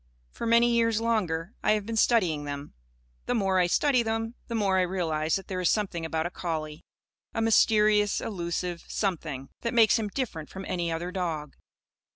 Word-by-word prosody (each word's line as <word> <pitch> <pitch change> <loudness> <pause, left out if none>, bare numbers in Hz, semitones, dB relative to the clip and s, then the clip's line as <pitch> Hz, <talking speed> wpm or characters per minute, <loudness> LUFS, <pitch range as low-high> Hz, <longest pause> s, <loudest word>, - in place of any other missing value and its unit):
For 235 - -5
many 235 +1 +5
years 230 -2 +2
longer, 205 -6 -1
I 215 - +3
have 210 -2 -1
been 230 +1 -4
studying 185 -10 +2
them. 145 0 -6 0.5
The 245 - +1
more 195 -4 +2
I 180 - +3
study 260 +7 +3
them, 225 0 -2
the 235 - -4
more 195 -4 +2
I - - +4
realise 165 -4 0
that 195 - -4
there 185 -1 -3
is 180 - +3
something 185 -6 -1
about 160 0 -1
a 175 - -3
collie 155 -3 -4 0.5
a - - 0
mysterious, 210 -2 +4
elusive 175 -3 -3
something 155 -9 -3
that 235 0 -2
makes 225 0 +5
him 215 - -2
different 200 - -4
from 190 0 -8
any 170 -2 -1
other 170 +2 -3
dog. 165 -6 -3
190 Hz, 185 wpm, -27 LUFS, 165-225 Hz, 0.5 s, many